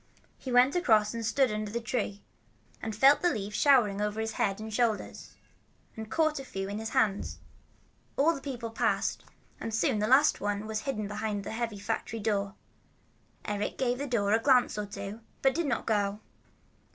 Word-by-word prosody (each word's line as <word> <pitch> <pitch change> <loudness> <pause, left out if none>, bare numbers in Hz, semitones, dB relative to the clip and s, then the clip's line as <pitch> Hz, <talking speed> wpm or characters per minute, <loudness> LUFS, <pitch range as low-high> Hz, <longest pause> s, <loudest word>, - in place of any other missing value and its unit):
He 260 - -6
went 250 +4 +5
across 220 - +3
and 230 0 -4
stood 245 +3 +2
under 215 0 -3
the 235 +3 -2
tree, 215 -3 -3 0.6
and 220 -1 -4
felt 275 +6 +6
the 355 - +3
leaves 210 0 -4
showering 235 -8 +4
on 210 0 -1
his 220 0 -2
head 195 -2 -1
and 220 0 -7
shoulders, 225 -2 -1 0.6
and 220 -1 -7
caught 310 +2 +1
a - - -6
few 195 -6 -5
in 205 +1 -4
his 220 0 -4
hands. 215 -6 0 0.8
All 310 +4 +4
the 275 - -7
people 245 -5 -5
passed, - - 0 0.4
and 225 - -4
soon 220 -1 +1
the 210 - +1
last 270 +5 +4
one 205 +1 -2
was 215 0 -2
hidden 215 -5 -3
behind 210 -1 -3
the - - -6
heavy 225 -1 -3
factory 210 +2 -3
door. 200 -2 -1 0.9
Eric 205 0 -3
gave 250 -1 0
the 285 - -3
door 210 -5 +1
a 225 - +4
glance 255 0 +3
or 210 -1 -3
two, 200 +2 -7 0.2
but 270 -1 +4
did 335 -2 -1
not 250 - -1
go. 205 -1 0
220 Hz, 190 wpm, -29 LUFS, 205-255 Hz, 0.9 s, felt